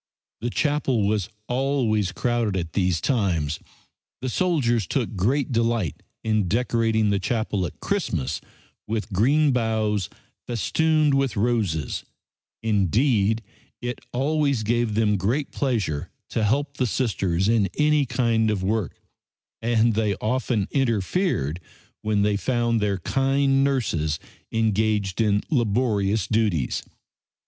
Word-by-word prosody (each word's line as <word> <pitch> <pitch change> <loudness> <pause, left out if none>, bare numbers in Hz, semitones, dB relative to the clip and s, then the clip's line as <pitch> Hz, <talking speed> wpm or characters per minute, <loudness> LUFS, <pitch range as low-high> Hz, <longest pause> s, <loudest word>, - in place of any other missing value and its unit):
The 120 - -2
chapel 135 -5 +1
was 105 -1 0 0.2
always 125 -7 +1
crowded 115 -1 0
at 85 -2 -4
these 90 -4 +1
times. 85 - 0 0.6
The 130 - -2
soldiers 120 - +1
took 120 - -1
great 130 +10 +1
delight 115 - 0 0.2
in 110 -3 +1
decorating 110 0 +1
the 100 - +1
chapel 105 -2 -1
at - - -13
Christmas 80 - -1 0.5
with 110 -1 -3
green 140 +9 +3
boughs, 110 -5 0 0.4
festooned 155 +6 +2
with 135 -4 +1
roses; 100 - 0 0.6
indeed, 110 - +2 0.4
it 120 0 -4
always 140 -2 +1
gave 115 0 0
them 105 -2 +2
great 120 +10 -1
pleasure 105 - -1 0.2
to 110 - 0
help 140 +6 0
the 130 - +1
Sisters 95 -7 0
in 110 -4 +3
any 150 -2 +3
kind 115 -2 +1
of 100 -3 -1
work, 105 -1 -1 0.6
and 115 0 +3
they 105 -2 +1
often 115 -2 -1
interfered 115 - 0 0.4
when 105 -1 +1
they 105 0 +2
found 120 -1 0
their 100 -2 +1
kind 135 +6 +2
nurses 85 - 0 0.3
engaged 110 -2 +1
in 105 -2 +2
laborious 110 - +1
duties. 105 - 0
110 Hz, 120 wpm, -24 LUFS, 100-130 Hz, 0.6 s, green